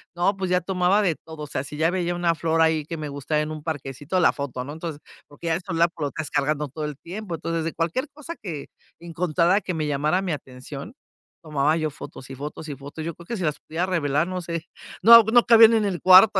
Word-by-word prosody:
no 180 Hz, +3 st, +2 dB
pues, 190 Hz, -2 st, -3 dB
ya 180 Hz, -, +3 dB
tomaba 185 Hz, +3 st, +2 dB
de 175 Hz, -4 st, +2 dB
todo, 160 Hz, -1 st, -10 dB
o -, -, -6 dB
sea, 135 Hz, -1 st, -3 dB
si 150 Hz, -, -8 dB
ya 160 Hz, +2 st, +2 dB
veía 175 Hz, -1 st, -1 dB
una 175 Hz, -1 st, +2 dB
flor 165 Hz, 0 st, 0 dB
ahí 160 Hz, -1 st, +3 dB
que 165 Hz, -, -5 dB
me 150 Hz, -1 st, -5 dB
gustaba 145 Hz, +2 st, -1 dB
en 150 Hz, +1 st, -3 dB
un 155 Hz, -1 st, -6 dB
parquecito, 145 Hz, +2 st, -3 dB
la 175 Hz, -, +4 dB
foto, 130 Hz, -3 st, -4 dB
¿no?, 145 Hz, -, -7 dB
entonces, 160 Hz, -2 st, -6 dB, 0.3 s
porque 145 Hz, +4 st, -13 dB
ya 165 Hz, -, +2 dB
el 170 Hz, -, -1 dB
celular 170 Hz, -1 st, +1 dB
lo 145 Hz, -, 0 dB
estás 150 Hz, +2 st, -5 dB
cargando 150 Hz, +1 st, 0 dB
todo 150 Hz, +3 st, -5 dB
el 150 Hz, -2 st, -5 dB
tiempo, 180 Hz, +2 st, -6 dB
entonces, 165 Hz, 0 st, -3 dB
de 165 Hz, -, -3 dB
cualquier 175 Hz, -, -1 dB
cosa 305 Hz, +3 st, -8 dB
que 160 Hz, -8 st, -6 dB, 0.3 s
encontrara 170 Hz, +3 st, +1 dB
que 180 Hz, -1 st, -4 dB
me 155 Hz, -1 st, -1 dB
llamara 150 Hz, +6 st, +1 dB
mi 180 Hz, -, -2 dB
atención, 140 Hz, -, -7 dB, 0.5 s
tomaba 150 Hz, 0 st, +1 dB
yo 155 Hz, -2 st, -1 dB
fotos, 130 Hz, -2 st, -10 dB
y -, -, -5 dB
fotos 150 Hz, +3 st, -7 dB
y 145 Hz, -, -4 dB
fotos, 140 Hz, +3 st, -8 dB
yo 170 Hz, -, -3 dB
creo 170 Hz, +2 st, -15 dB
que 235 Hz, -, -3 dB
si 185 Hz, -, -4 dB
las 150 Hz, -3 st, -1 dB
pudiera 165 Hz, +3 st, -3 dB
revelar, 155 Hz, -4 st, 0 dB
no 185 Hz, 0 st, -3 dB
sé, 170 Hz, -1 st, -4 dB, 0.4 s
no 230 Hz, +2 st, +11 dB
no 235 Hz, +2 st, +5 dB
cabían 230 Hz, -1 st, +8 dB
en 220 Hz, -2 st, +2 dB
el 185 Hz, -4 st, -2 dB
cuarto, 190 Hz, +2 st, +8 dB
165 Hz, 245 wpm, -24 LUFS, 150-180 Hz, 0.5 s, no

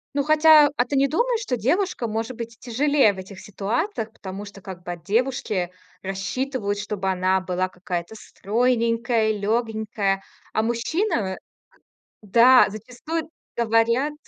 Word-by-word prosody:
Ну, 280 Hz, -, +2 dB
хотя, 310 Hz, 0 st, +6 dB
а 245 Hz, -, +2 dB
ты 280 Hz, +2 st, -1 dB
не 275 Hz, +1 st, +4 dB
думаешь, 470 Hz, -, +1 dB
что 260 Hz, -, -1 dB
девушкам, 270 Hz, -, 0 dB
может 225 Hz, +3 st, -3 dB
быть, 230 Hz, -1 st, -7 dB
тяжелее 265 Hz, -2 st, +2 dB
в -, -, -13 dB
этих 190 Hz, 0 st, -9 dB
ситуациях? 220 Hz, -, -3 dB
Потому 195 Hz, -1 st, -8 dB
что 200 Hz, -1 st, -11 dB
как 185 Hz, -2 st, -9 dB
бы 175 Hz, -, -5 dB
от 175 Hz, -1 st, -8 dB
девушки 215 Hz, -5 st, 0 dB, 0.3 s
рассчитывают, 205 Hz, +3 st, -3 dB
чтобы 205 Hz, -2 st, -3 dB
она 185 Hz, 0 st, +2 dB
была 185 Hz, 0 st, -2 dB
какая-то 180 Hz, +2 st, -5 dB
стройненькая, 230 Hz, +1 st, 0 dB
лёгенькая. 215 Hz, -2 st, -1 dB, 0.3 s
А 220 Hz, -, +1 dB
мужчина 235 Hz, -, 0 dB
в -, -, -3 dB
э, 190 Hz, -, -4 dB, 0.9 s
да, 235 Hz, +5 st, +6 dB
зачастую 250 Hz, +10 st, -5 dB, 0.3 s
говорят 235 Hz, +5 st, +2 dB
225 Hz, 145 wpm, -23 LUFS, 195-255 Hz, 0.9 s, хотя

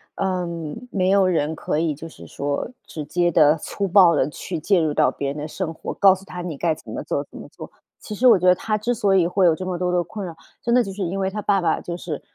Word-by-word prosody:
嗯， 180 Hz, +2 st, -3 dB
没 185 Hz, -2 st, +1 dB
有 195 Hz, 0 st, +4 dB
人 160 Hz, -3 st, 0 dB
可 150 Hz, -, -2 dB
以 160 Hz, -2 st, 0 dB
就 160 Hz, +3 st, -9 dB
是 165 Hz, -, -13 dB
说 140 Hz, +8 st, -3 dB, 0.2 s
直 155 Hz, -, -7 dB
接 175 Hz, +4 st, 0 dB
地 155 Hz, -1 st, +5 dB
粗 200 Hz, +5 st, -4 dB
暴 180 Hz, -3 st, +6 dB
地 140 Hz, -1 st, +1 dB
去 170 Hz, +3 st, -6 dB
介 185 Hz, +4 st, +2 dB
入 155 Hz, -2 st, 0 dB
到 -, -, +3 dB
别 140 Hz, -, -4 dB
人 145 Hz, -, -5 dB
的 150 Hz, -, -4 dB
生 160 Hz, +1 st, -4 dB
活， -, -, -6 dB
告 195 Hz, -2 st, +6 dB
诉 190 Hz, 0 st, -8 dB
他 180 Hz, -2 st, -7 dB
你 165 Hz, -5 st, -5 dB
该 160 Hz, +1 st, 0 dB
怎 -, -, -12 dB
么 -, -, -4 dB
做 -, -, -2 dB
怎 -, -, -11 dB
么 -, -, -10 dB
做。 -, -, -11 dB, 0.3 s
其 215 Hz, -, -8 dB
实 245 Hz, +5 st, +3 dB
我 235 Hz, -, +7 dB
觉 180 Hz, -, -2 dB
得 180 Hz, -, +7 dB
她 215 Hz, +4 st, -2 dB
之 235 Hz, +4 st, -1 dB
所 200 Hz, -3 st, +2 dB
以 180 Hz, -3 st, +4 dB
会 185 Hz, +2 st, +2 dB
有 160 Hz, -, +4 dB
这 185 Hz, -, -6 dB
么 185 Hz, -1 st, -3 dB
多 180 Hz, 0 st, 0 dB
的 180 Hz, -1 st, +1 dB
困 200 Hz, +4 st, -7 dB
扰， 165 Hz, -, -8 dB, 0.3 s
真 235 Hz, 0 st, +1 dB
的 250 Hz, -, +5 dB
就 195 Hz, -3 st, -6 dB
是 205 Hz, -, -7 dB
因 185 Hz, +2 st, -3 dB
为 190 Hz, 0 st, 0 dB
她 210 Hz, -, -4 dB
爸 200 Hz, -1 st, +2 dB
爸 175 Hz, -, 0 dB
就 170 Hz, 0 st, -5 dB
是 160 Hz, -4 st, -6 dB
180 Hz, 305 characters per minute, -22 LUFS, 160-195 Hz, 0.3 s, 我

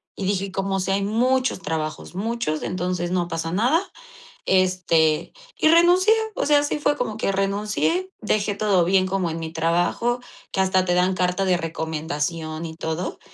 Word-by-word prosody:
Y 195 Hz, -, -4 dB
dije: 195 Hz, 0 st, 0 dB
"Y 195 Hz, -, -8 dB
como 195 Hz, 0 st, -1 dB
sea, 195 Hz, +1 st, 0 dB
hay 200 Hz, -, -1 dB
muchos 255 Hz, +5 st, +1 dB
trabajos, 155 Hz, +1 st, -4 dB
muchos, 210 Hz, -6 st, -2 dB
entonces 180 Hz, -1 st, -2 dB
no 180 Hz, -1 st, 0 dB
pasa 165 Hz, -1 st, -3 dB
nada". 245 Hz, -, +2 dB, 0.7 s
Este, 180 Hz, -4 st, +2 dB, 0.2 s
y -, -, +3 dB
renuncié, 350 Hz, +5 st, +5 dB, 0.2 s
o -, -, -1 dB
sea, 290 Hz, 0 st, +5 dB
así 290 Hz, +1 st, -1 dB
fue 290 Hz, 0 st, +2 dB
como 220 Hz, -6 st, -3 dB
que 220 Hz, -, 0 dB
renuncié, 210 Hz, -, 0 dB
dejé 210 Hz, -2 st, 0 dB
todo 195 Hz, -5 st, +2 dB
bien 185 Hz, +1 st, +3 dB
como 185 Hz, -2 st, -1 dB
en 165 Hz, +1 st, -4 dB
mi 160 Hz, -1 st, -5 dB
trabajo, 175 Hz, +9 st, 0 dB, 0.3 s
que 190 Hz, -, +1 dB
hasta 190 Hz, -1 st, +2 dB
te 175 Hz, -, +1 dB
dan 180 Hz, +1 st, +2 dB
carta 180 Hz, +1 st, 0 dB
de 185 Hz, -2 st, +2 dB
recomendación 160 Hz, 0 st, -3 dB
y 160 Hz, -1 st, -7 dB
todo, 165 Hz, +2 st, -4 dB
185 Hz, 175 wpm, -23 LUFS, 165-215 Hz, 0.7 s, renuncié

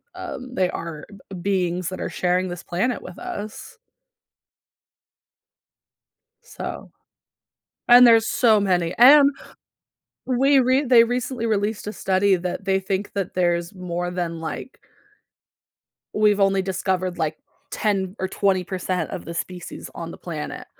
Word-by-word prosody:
um, 255 Hz, -1 st, -7 dB
they 185 Hz, -6 st, +1 dB
are 165 Hz, -3 st, -6 dB, 0.2 s
b 195 Hz, -, -7 dB
beings 180 Hz, -2 st, -1 dB
that 185 Hz, -, -7 dB
are -, -, -3 dB
sharing 180 Hz, +1 st, 0 dB
this 175 Hz, -1 st, -6 dB
planet 235 Hz, +8 st, -1 dB
with -, -, -11 dB
us. 345 Hz, -, -7 dB, 2.7 s
So, -, -, -8 dB, 1.0 s
and 245 Hz, +1 st, +9 dB
there's 225 Hz, -1 st, +5 dB
so 220 Hz, -4 st, +4 dB
many, 180 Hz, -4 st, 0 dB
and 280 Hz, +4 st, +8 dB, 1.0 s
we 270 Hz, +2 st, +3 dB
re 260 Hz, +3 st, +2 dB
they 240 Hz, -3 st, +6 dB
recently 245 Hz, 0 st, -2 dB
released 210 Hz, -1 st, -1 dB
a 210 Hz, -, -4 dB
study 190 Hz, 0 st, +2 dB
that 180 Hz, +2 st, -5 dB
they 190 Hz, 0 st, +1 dB
think 195 Hz, +1 st, -3 dB
that 195 Hz, -3 st, -3 dB
there's 175 Hz, 0 st, 0 dB
more 175 Hz, -1 st, -4 dB
than 170 Hz, -2 st, -4 dB
like 165 Hz, +10 st, -7 dB, 1.3 s
we've 210 Hz, -1 st, +3 dB
only 195 Hz, -1 st, +3 dB
discovered, 185 Hz, -1 st, -2 dB
like, 155 Hz, -1 st, -1 dB, 0.3 s
10 195 Hz, -2 st, -1 dB
or 190 Hz, -, -2 dB
20% 185 Hz, -2 st, -1 dB
of 180 Hz, -, -6 dB
the 170 Hz, -, -7 dB
species 180 Hz, +1 st, -6 dB
on 170 Hz, 0 st, -6 dB
the -, -, -9 dB
planet, 155 Hz, -4 st, -6 dB
190 Hz, 135 wpm, -23 LUFS, 180-225 Hz, 2.7 s, and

